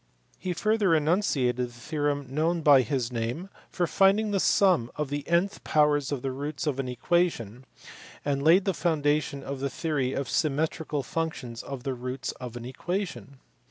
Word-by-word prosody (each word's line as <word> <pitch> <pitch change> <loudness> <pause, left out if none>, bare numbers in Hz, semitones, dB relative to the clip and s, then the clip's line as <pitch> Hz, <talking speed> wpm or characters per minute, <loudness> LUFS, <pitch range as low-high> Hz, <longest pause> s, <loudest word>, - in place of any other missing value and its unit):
He 185 - -2
further 210 -2 +2
enunciated 150 -6 +1
the 125 0 0
theorem 145 +3 -2
known 160 +5 0
by 145 -3 +7
his 125 0 -2
name 120 +10 -3 0.2
for 180 - 0
finding 200 +4 +3
the 200 - +1
sum 180 - +3
of 150 -2 -3
the 145 0 -2
nth 175 +4 +1
powers 150 -2 +2
of 140 -4 -3
the 135 - -1
roots 145 +4 -4
of 140 -3 -1
an 135 - -2
equation, 125 - 0 0.6
and 140 -1 0
laid 170 +6 +5
the 195 - +1
foundation 150 -4 0
of 140 0 -5
the 140 +1 -1
theory 135 -2 -1
of 140 - -2
symmetrical 155 -1 -1
functions 130 -6 -4
of 135 -3 -7
the 135 - -2
roots 125 +1 -4
of 125 -2 -6
an 120 -1 -7
equation. 170 +1 -4
145 Hz, 170 wpm, -27 LUFS, 130-170 Hz, 0.6 s, by